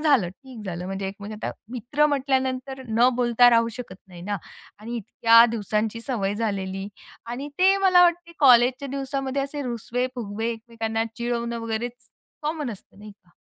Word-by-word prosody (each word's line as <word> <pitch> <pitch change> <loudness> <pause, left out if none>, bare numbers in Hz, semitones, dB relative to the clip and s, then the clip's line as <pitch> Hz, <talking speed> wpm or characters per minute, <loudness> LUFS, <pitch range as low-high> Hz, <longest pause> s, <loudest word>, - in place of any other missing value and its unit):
झालं 280 - +3
ठीक 235 +3 -12
झालं. 180 -1 -4
म्हणजे 195 +1 -3
एक 195 - -7
म्हणजे 210 +2 -7
आता - - -1 0.2
मित्र 255 +5 +1
म्हटल्यानंतर 265 -1 -1
न 230 +3 +4
बोलता 245 0 +5
राहू 230 -1 +4
शकत 230 -7 -7
नाही 175 -2 -11
ना 205 +2 -2 0.4
आणि 230 +3 -6
इतक्या 230 +1 +5
दिवसांची 220 0 -1
सवय 220 -6 -2
झालेली. 195 -3 -3 0.4
आणि 250 +5 -5
ते 380 +2 +5
मला 375 -2 +5
वाटते 345 -1 +2
कॉलेजच्या 255 0 +5
दिवसामध्ये 270 0 -2
असे 285 +1 -4
रुसवे-फुगवे, 235 -2 -3
एकमेकांना 225 -1 -3
चिडवणं 235 -1 -2
वगैरेच 230 +1 -3 0.5
कॉमन 300 -3 -2
असतं, 200 -2 -12
नाही 210 0 -11
का? 180 -3 -31
235 Hz, 155 wpm, -24 LUFS, 215-270 Hz, 0.5 s, बोलता